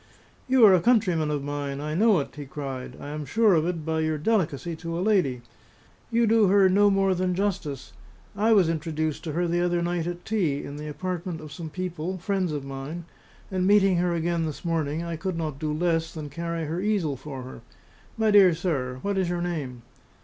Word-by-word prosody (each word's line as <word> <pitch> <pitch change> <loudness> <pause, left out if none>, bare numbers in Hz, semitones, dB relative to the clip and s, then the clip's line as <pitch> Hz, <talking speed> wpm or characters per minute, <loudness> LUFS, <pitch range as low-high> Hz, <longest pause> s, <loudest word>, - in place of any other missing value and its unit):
"You 255 -3 +6
are 200 - +8
a 180 - +4
countryman 185 -9 +2
of 145 -2 -2
mine; 145 -1 -4
I 150 +1 -3
know 210 +4 +4
it!" - - -9
he 145 -1 -7
cried: 135 -3 -6
"I 145 - -7
am 150 0 -4
sure 210 +8 +3
of 160 -1 +2
it 170 -4 -3
by 160 0 0
your 155 -1 0
delicacy 170 - 0
to 165 0 -5
a - - -2
lady. 180 - +1 0.7
You 235 0 +3
do 220 -1 +4
her 195 0 +5
no 205 +2 +5
more 195 -1 +2
than 180 0 0
justice. 175 -9 -3 0.4
I 215 +3 +2
was 195 -6 +5
introduced 155 -1 -2
to 155 - -3
her 175 +2 0
the 175 +1 +1
other 175 -1 +1
night 175 -1 -1
at 175 0 -6
tea, 175 -11 0
in 145 - -7
the 150 +1 -6
apartment 180 +2 -4
of 155 -2 -10
some 165 -1 -6
people, 180 +1 -4
friends 185 -1 -1
of 145 -2 -4
mine; 135 +5 -6 0.5
and 185 -1 0
meeting 195 -2 +5
her 175 0 +1
again 170 0 0
this 155 +3 -7
morning, 160 -1 -1
I 170 -1 -4
could 185 +1 -3
not 155 -4 -3
do 155 -1 -2
less 165 +1 0
than 150 -3 -7
carry 170 +1 -3
her 160 +4 -3
easel 195 -8 0
for 135 -1 -8
her. 125 -2 -10 0.6
My 220 -1 +2
dear 195 -5 +7
sir, 140 -8 -2
what 200 -1 0
is 185 -2 0
your 175 0 -1
name?" 140 -9 -4
170 Hz, 215 wpm, -26 LUFS, 150-185 Hz, 0.7 s, are